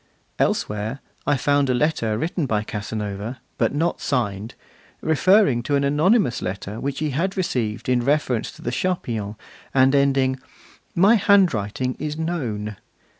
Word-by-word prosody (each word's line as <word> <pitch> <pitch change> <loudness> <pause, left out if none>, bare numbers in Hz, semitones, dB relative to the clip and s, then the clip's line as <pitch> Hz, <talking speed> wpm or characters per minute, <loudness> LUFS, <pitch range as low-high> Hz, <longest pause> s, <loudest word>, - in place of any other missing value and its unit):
Elsewhere, 105 +5 -1 0.3
I 145 - +3
found 145 +1 +2
a 125 - +2
letter 120 -6 0
written 165 - -1
by 105 -3 0
Casanova, 105 +2 -5 0.2
but - - +2
not 165 +3 0
signed, 110 -5 -2 0.4
referring 160 - +3
to 140 +4 0
an 140 - +2
anonymous 150 - +2
letter 100 +3 -4
which 140 0 -3
he 155 -1 -1
had 185 +8 -1
received 120 - -2
in 125 -1 +2
reference 135 -4 0
to - - -14
the 120 - -2
Charpillons, 115 - -2 0.4
and 130 +1 +5
ending: 135 -2 +2 0.6
'My 200 +7 +6
handwriting 130 - +2
is 150 0 -3
known. 115 - -3
130 Hz, 140 wpm, -23 LUFS, 110-155 Hz, 0.6 s, My